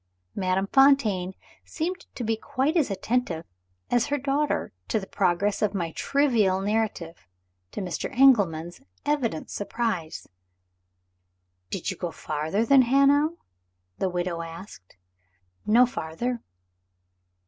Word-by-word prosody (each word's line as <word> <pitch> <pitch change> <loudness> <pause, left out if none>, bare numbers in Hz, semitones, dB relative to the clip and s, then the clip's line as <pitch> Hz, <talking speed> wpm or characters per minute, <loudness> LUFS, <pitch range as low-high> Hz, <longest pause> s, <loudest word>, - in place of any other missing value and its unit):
Madame 185 0 0
Fontaine 215 -8 +3 0.3
seemed 350 +3 -4
to 245 - -4
be 225 0 +1
quite 265 +7 -1
as 310 -8 +2
attentive 195 -5 -1 0.5
as 240 +1 +2
her 290 0 0
daughter 285 - -1
to 220 - 0
the 190 - -7
progress 195 +1 0
of 210 -1 +1
my 170 -4 -2
trivial 235 - +2
narrative 200 - -2 0.4
to - - -5
Mr. 180 -3 -3
Engelman's 185 -10 +4 0.2
evident 260 - -1
surprise. 205 -6 -3 1.4
"Did 190 +1 -3
you 185 - -7
go 175 - -3
farther 160 +6 -2
than 275 +1 +6
Hanau?" 280 +5 +3 0.6
the 190 - +1
widow 175 -1 -2
asked. 165 - -10 0.7
"No 235 +4 +6
farther." 235 +4 -4
210 Hz, 115 wpm, -26 LUFS, 180-265 Hz, 1.4 s, than